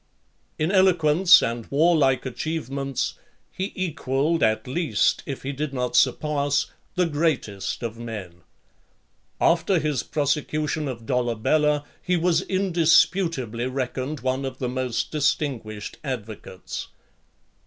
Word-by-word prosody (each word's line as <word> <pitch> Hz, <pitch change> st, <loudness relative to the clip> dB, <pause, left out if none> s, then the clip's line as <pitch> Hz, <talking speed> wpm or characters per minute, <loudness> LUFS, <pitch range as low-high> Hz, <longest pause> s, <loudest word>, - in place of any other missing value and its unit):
LV. -, -, 0 dB
In 160 Hz, -, +1 dB
eloquence 180 Hz, -2 st, +5 dB
and 115 Hz, -1 st, -3 dB
warlike 145 Hz, -3 st, +3 dB
achievements, 135 Hz, -1 st, -3 dB, 0.3 s
he 190 Hz, +2 st, -4 dB
equalled 155 Hz, -3 st, 0 dB
at 110 Hz, 0 st, +2 dB
least, 160 Hz, +5 st, +1 dB
if 140 Hz, -3 st, -5 dB
he 135 Hz, -, -2 dB
did 140 Hz, 0 st, -4 dB
not 125 Hz, -1 st, -2 dB
surpass, 145 Hz, 0 st, +2 dB, 0.3 s
the 180 Hz, -1 st, +3 dB
greatest 145 Hz, -, -1 dB
of 115 Hz, 0 st, -4 dB
men. 100 Hz, -7 st, -7 dB, 1.0 s
After 170 Hz, +3 st, +3 dB
his 150 Hz, -4 st, 0 dB
prosecution 150 Hz, +1 st, -1 dB
of 115 Hz, -4 st, -6 dB
Dolabella, 130 Hz, +5 st, +1 dB, 0.2 s
he 180 Hz, -1 st, +1 dB
was 170 Hz, -1 st, +2 dB
indisputably 165 Hz, -, +2 dB
reckoned 130 Hz, +2 st, -3 dB
one 130 Hz, +2 st, -1 dB
of 130 Hz, -1 st, -5 dB
the 130 Hz, -, -2 dB
most 125 Hz, -3 st, -2 dB
distinguished 130 Hz, -8 st, -2 dB
advocates. 110 Hz, -, -6 dB
140 Hz, 115 wpm, -24 LUFS, 125-160 Hz, 1.0 s, eloquence